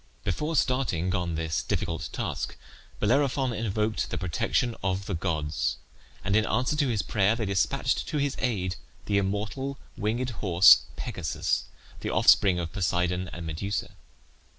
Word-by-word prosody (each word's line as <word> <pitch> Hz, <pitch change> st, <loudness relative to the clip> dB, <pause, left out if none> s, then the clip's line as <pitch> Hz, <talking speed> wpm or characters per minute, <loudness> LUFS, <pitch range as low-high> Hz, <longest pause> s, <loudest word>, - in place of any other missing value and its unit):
Before 150 Hz, -, -1 dB
starting 115 Hz, -, +1 dB
on 90 Hz, -3 st, -1 dB
this 80 Hz, -1 st, -1 dB
difficult 85 Hz, +1 st, -2 dB
task -, -, -3 dB, 0.4 s
Bellerophon 130 Hz, +2 st, +2 dB
invoked 110 Hz, 0 st, -1 dB
the -, -, -3 dB
protection 105 Hz, +7 st, 0 dB
of 95 Hz, +1 st, -1 dB
the 100 Hz, -, -3 dB
gods, 75 Hz, -7 st, -1 dB, 0.5 s
and 100 Hz, -, +1 dB
in 110 Hz, -, +4 dB
answer 125 Hz, +7 st, 0 dB
to 150 Hz, -2 st, +2 dB
his 115 Hz, -5 st, 0 dB
prayer 105 Hz, +1 st, +2 dB
they 115 Hz, -2 st, -2 dB
despatched 95 Hz, -4 st, 0 dB
to -, -, -2 dB
his 145 Hz, -1 st, 0 dB
aid 95 Hz, -8 st, -1 dB, 0.3 s
the 100 Hz, -1 st, +2 dB
immortal 105 Hz, +8 st, -2 dB, 0.2 s
winged 120 Hz, +5 st, -1 dB
horse 95 Hz, -5 st, +6 dB
Pegasus, -, -, -2 dB, 0.3 s
the -, -, -3 dB
offspring 95 Hz, -3 st, +5 dB
of 85 Hz, -2 st, -4 dB
Poseidon 90 Hz, 0 st, 0 dB
and 85 Hz, -1 st, -7 dB
Medusa. 85 Hz, +6 st, -3 dB
100 Hz, 145 wpm, -27 LUFS, 90-120 Hz, 0.5 s, horse